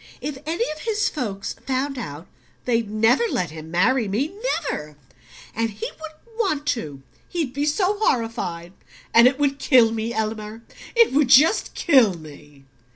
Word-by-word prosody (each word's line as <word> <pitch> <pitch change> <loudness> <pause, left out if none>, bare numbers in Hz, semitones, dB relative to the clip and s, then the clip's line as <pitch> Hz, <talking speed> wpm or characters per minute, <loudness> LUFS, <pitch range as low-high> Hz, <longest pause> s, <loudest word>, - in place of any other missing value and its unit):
If 275 0 -5
any 335 +8 0
of 305 - -7
his 425 +2 0
folks 205 -9 -4
found 270 +1 -1
out, 150 -6 -7 0.4
they'd 230 -3 0
never 225 - +3
let 175 -4 -1
him 160 0 -9
marry 215 +8 +2
me 245 - -1 0.3
never! 150 - -5 0.6
And 230 0 -1
he 210 0 -6
wouldn't 320 +9 -13
want 310 -10 0
to: 150 - -4 0.3
he'd 320 -8 -3
be 285 +2 -1
so 380 +6 +1
horrified. 200 - -1 0.4
And 235 +1 +8
it 260 +1 +1
would 280 -1 0
KILL 240 -6 +5
me, 225 +1 -3
Elmer 220 0 -4 0.3
it 465 - +5
would 285 -1 +3
just 290 - +4
kill 255 - +4
me!" 145 -3 -14
240 Hz, 155 wpm, -22 LUFS, 200-295 Hz, 0.6 s, And